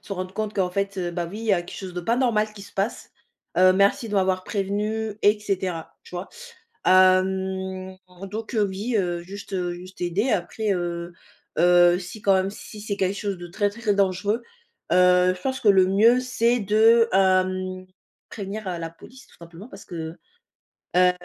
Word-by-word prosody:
se - - -8
rendre 185 -1 -5
compte 215 0 -3
qu'en 185 -2 0
fait, 200 +1 -2
bah 170 -1 -2
oui, 205 - -7
il 230 - -6
y 205 - +3
a 175 - +3
quelque 175 - -10
chose 185 -2 -7
de 180 - -3
pas 230 +7 0
normal 220 -4 +1
qui 200 - -10
se - - -13
passe, 200 +4 -3 0.5
heu, 185 0 +7
merci 200 +4 +2
de 210 - -4
m'avoir 185 -1 +1
prévenu 210 +2 -2
et 210 +1 +4
cetera, 185 -5 -3
tu - - -13
vois? 180 +2 -5 0.6
Hem, 190 0 +2 0.3
donc 220 +3 -6
heu, 215 - +3
oui, 200 +5 -3
heu, 175 -3 -1
juste 190 -1 -4
juste 185 +2 -12
aider. 180 +8 0
Après, 210 +3 -1
heu 175 -1 -3 0.5
heu, 175 +1 +5
si 185 +3 -9
quand 195 - +4
même 190 +1 +1
si 210 +1 -11
c'est 205 -1 -4
quelque 190 0 0
chose 200 -3 -3
de 175 0 -8
très, 205 +4 0
très 215 -1 -1
dangereux, 200 +3 0 0.5
heu, 180 0 +5
je - - -14
pense 265 0 -2
que 215 - +2
le 190 -2 +6
mieux, 220 +6 +4
c'est 245 -1 +1
de, 225 +3 +4
hem, 185 -1 +1 0.4
prévenir, 200 0 -6
heu, 175 -2 -3
la 165 -1 -5
police 255 +10 -15
tout - - -21
simplement 170 +6 -12
parce 195 -4 -12
que, 165 -1 -6 0.8
heu 180 0 +6
190 Hz, 190 wpm, -24 LUFS, 180-210 Hz, 0.8 s, heu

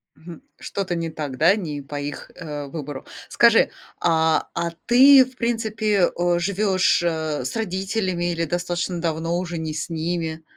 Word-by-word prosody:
Хм, 170 +7 -12 0.2
что-то 185 -3 -3
не 165 -1 -2
так, 145 -5 -6
да? 170 +6 +5
Не 150 -8 -4
по 145 +1 -6
их, 145 0 -6
э, 150 -4 -6
выбору. 145 -2 -7 0.2
Скажи, - - +5 0.3
а, 160 -1 +2
а 170 0 -2
ты, 260 +2 +8
в 255 0 -16
принципе, 220 -4 +1
э, 175 0 +2
живёшь, 190 0 +2
э, 160 -5 -1
с - - -4
родителями 190 -3 -1
или 165 0 -1
достаточно 175 +1 -2
давно 165 +1 -1
уже 175 -2 -4
не 160 -1 -4
с 160 +3 -4
ними? 165 -1 -3
170 Hz, 160 wpm, -23 LUFS, 160-190 Hz, 0.3 s, ты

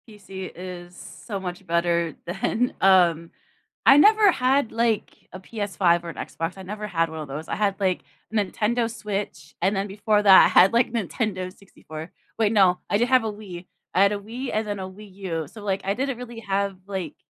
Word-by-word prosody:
PC 195 -3 -9
is 180 0 -9
so 200 +3 -8
much 180 0 -6
better 170 -1 0
than 225 +7 -1
um, 175 -4 +4 0.5
I 275 - +8
never 420 +4 +6
had, 265 -4 +1
like, 230 -1 -1
a 185 - -7
PS5 190 -4 0
or 170 - -6
an 165 - -8
Xbox, 165 +3 -5
I 190 - -9
never 210 +3 -6
had 165 -4 0
one 160 0 -7
of 155 - -6
those, 150 +4 -6
I - - -2
had, 200 -2 0
like, 185 -2 0 0.3
Nintendo 220 +3 0
Switch, 200 -8 -5
and 190 +4 +2
then 195 +1 -1
before 205 +1 +1
that, 195 -2 +9
I - - +5
had, 185 +4 +6
like, 235 0 +3
Nintendo 200 -3 -2
64. 160 -4 -11 0.3
Wait, 215 -2 +3
no, 190 -4 +4
I 205 - +2
did 240 +3 +1
have 255 -2 +4
a 220 - -2
Wii. 185 -4 -10 0.3
I 185 - +3
had 200 - +4
a 205 - -3
Wii 240 +6 -6
and 215 0 -1
then 205 -1 -3
a 190 0 -5
Wii 200 +1 -13
U, 165 -6 -4
so, 215 +7 -12
like, 195 -2 -1
I 195 - +1
didn't 270 0 -2
really 240 -1 -8
have, 200 -1 -1
like 190 -3 -5
195 Hz, 205 wpm, -24 LUFS, 180-215 Hz, 0.5 s, that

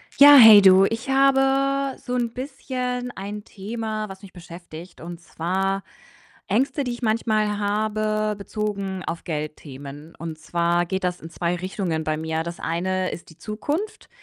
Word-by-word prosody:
Ja, 285 +1 +9
hey 220 -4 +10
du, 190 0 +7
ich 225 +6 -3
habe 275 0 +2
so 250 - -4
'n 235 -2 -1
bisschen 250 -2 -4
ein 205 +2 -6
Thema, 215 +1 -5
was 195 0 -10
mich 195 - -13
beschäftigt, 170 -1 -11
und 170 +1 -8
zwar 190 +4 -2 0.6
Ängste, 265 +7 0
die 250 - -3
ich 240 - -9
manchmal 215 -2 0
habe, 215 +1 -1
bezogen 200 -2 -4
auf 170 - -5
Geldthemen 150 -1 -7
und 160 -1 -7
zwar 170 +2 0
geht 190 +2 -3
das 180 0 -2
in 165 - -9
2 170 +1 -2
Richtungen 180 -3 -3
bei 155 0 -1
mir. 160 0 -2
Das 170 +1 -7
eine 185 +3 -1
ist 170 - -9
die 160 - -17
Zukunft, 295 - -4
200 Hz, 155 wpm, -23 LUFS, 170-230 Hz, 0.6 s, hey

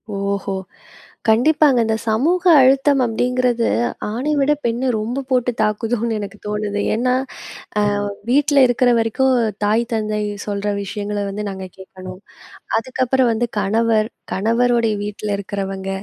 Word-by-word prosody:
ஓஹோ! 200 0 -2 0.7
கண்டிப்பாங்க 265 +4 +4
இந்த 220 0 +1
சமூக 315 +12 +1 0.2
அழுத்தம் 270 +1 +4
அப்படிங்கிறது 245 +1 0 0.4
ஆண 240 +4 -4 0.2
விட 275 +1 +2
பெண்ண 235 +3 0
ரொம்ப 240 +6 -3
போட்டு 250 -1 +1
தாக்குதோன்னு 225 +2 0
எனக்கு 205 +1 -7
தோணுது. 210 0 -2
ஏன்னா, 250 +3 +1 0.7
அ - - +3 0.5
வீட்ல 285 +1 +4
இருக்கிற 245 +1 +2
வரைக்கும் 260 +4 +1 0.3
தாய், 215 +3 +2
தந்தை 215 -1 -1 0.3
சொல்ற 205 0 -2
விஷயங்கள 205 +1 -4
வந்து 210 +2 -4
நாங்க 190 -1 -6
கேட்கணும். 185 -1 -10 0.6
அதுக்கப்புறம் 255 +1 +1
வந்து 235 +2 -1
கணவர், 220 +2 +1 0.2
கணவருடைய 230 +2 +2
வீட்டுல 210 0 -3
இருக்கிறவங்க, 195 -1 -5
225 Hz, 120 wpm, -19 LUFS, 205-250 Hz, 0.7 s, கண்டிப்பாங்க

